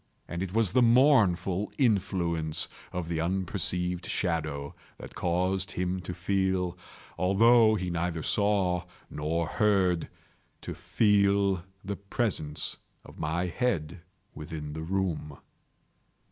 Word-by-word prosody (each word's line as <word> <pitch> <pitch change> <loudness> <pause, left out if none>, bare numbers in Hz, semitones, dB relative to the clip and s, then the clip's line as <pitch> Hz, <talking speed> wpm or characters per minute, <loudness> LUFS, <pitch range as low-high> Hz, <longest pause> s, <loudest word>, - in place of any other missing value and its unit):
And 85 0 -4
it 95 -2 -3
was 110 -3 +1
the 125 - +5
mournful 115 -7 +4
influence 85 - +1 0.2
of 90 -2 -4
the 80 -1 -1
unperceived 90 0 -1
shadow 80 -6 -1 0.2
that - - -10
caused 95 +2 0
him 90 +1 -1
to 90 0 -6
feel—although 95 +4 +2
he 90 -3 -2
neither 85 -1 -2
saw 95 -3 +2 0.3
nor 80 +3 -1
heard—to 95 -2 -1
feel 100 -3 +2 0.2
the 100 0 -3
presence 100 - -2 0.3
of - - -14
my 80 +4 -1
head 85 -5 -2 0.3
within 75 -1 -7
the 80 - -5
room. 85 -4 -2
90 Hz, 105 wpm, -28 LUFS, 85-100 Hz, 0.3 s, the